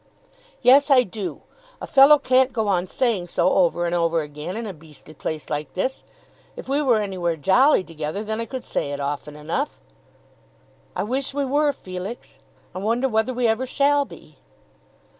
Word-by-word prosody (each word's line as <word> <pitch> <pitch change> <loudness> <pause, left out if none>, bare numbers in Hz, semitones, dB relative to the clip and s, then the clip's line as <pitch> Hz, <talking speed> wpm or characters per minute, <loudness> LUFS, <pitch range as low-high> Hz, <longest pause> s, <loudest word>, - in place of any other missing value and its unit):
"Yes, 280 +3 +6
I 260 -3 +6
do. 205 -2 -6 0.4
A - - -6
fellow 280 +2 +7
can't 260 -1 +3
go 220 -4 -1
on 185 -2 +1
saying 220 -6 -1
so 175 +1 +1
over 175 -1 +2
and 170 - -1
over 170 -1 +1
again 150 +6 -6
in 230 - -4
a 200 - -5
beastly 155 -1 -16
place 155 +2 -5
like 150 -2 -4
this. 255 +8 -2 0.5
If - - -9
we 280 +2 +1
were 245 -6 +3
anywhere 185 -5 -2
jolly 195 - +4
together, 160 +4 -5
then 220 +1 -3
I - - -3
could 255 +2 -7
say - - -2
it 140 - -5
often 145 +1 -4
enough." 165 - -3 1.2
"I - - -1
wish 265 +5 -3
we 285 -1 0
were, 290 +2 +2
Felix. 185 0 -8 0.3
I 185 - -5
wonder 230 +6 0
whether 220 +1 0
we 250 -1 -1
ever 225 +4 0
shall 285 +2 +2
be." - - -15
210 Hz, 180 wpm, -23 LUFS, 170-260 Hz, 1.2 s, fellow